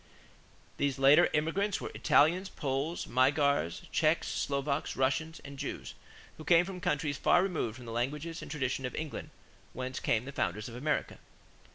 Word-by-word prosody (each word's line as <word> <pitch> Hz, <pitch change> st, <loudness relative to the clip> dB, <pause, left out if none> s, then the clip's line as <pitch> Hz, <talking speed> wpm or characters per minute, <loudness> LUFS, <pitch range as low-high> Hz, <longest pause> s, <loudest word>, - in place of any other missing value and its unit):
These 140 Hz, -2 st, 0 dB
later 135 Hz, +2 st, +6 dB
immigrants 170 Hz, +7 st, 0 dB
were -, -, -6 dB
Italians, 175 Hz, +6 st, +3 dB
Poles, 140 Hz, +4 st, -2 dB
Magyars, 135 Hz, -, +2 dB
Czechs, -, -, +2 dB
Slovaks, 140 Hz, +1 st, -1 dB
Russians, 140 Hz, +5 st, 0 dB
and 140 Hz, -1 st, -9 dB
Jews, -, -, -5 dB, 0.4 s
who 155 Hz, -, -9 dB
came 170 Hz, +2 st, +5 dB
from 185 Hz, -1 st, -7 dB
countries 150 Hz, -6 st, -1 dB
far 175 Hz, -, +4 dB
removed 160 Hz, -, -2 dB
from 125 Hz, -1 st, -11 dB
the 115 Hz, -, -7 dB
language 135 Hz, +7 st, -2 dB
and 165 Hz, -1 st, -6 dB
the -, -, -7 dB
traditions 135 Hz, -3 st, -2 dB
of -, -, -8 dB
England 155 Hz, -2 st, -5 dB, 0.4 s
whence 130 Hz, +1 st, -4 dB
came 115 Hz, +1 st, 0 dB
the 140 Hz, -, -6 dB
founders 105 Hz, -5 st, -2 dB
of 120 Hz, -, -9 dB
America. 145 Hz, +5 st, -2 dB
140 Hz, 165 wpm, -31 LUFS, 130-160 Hz, 0.4 s, later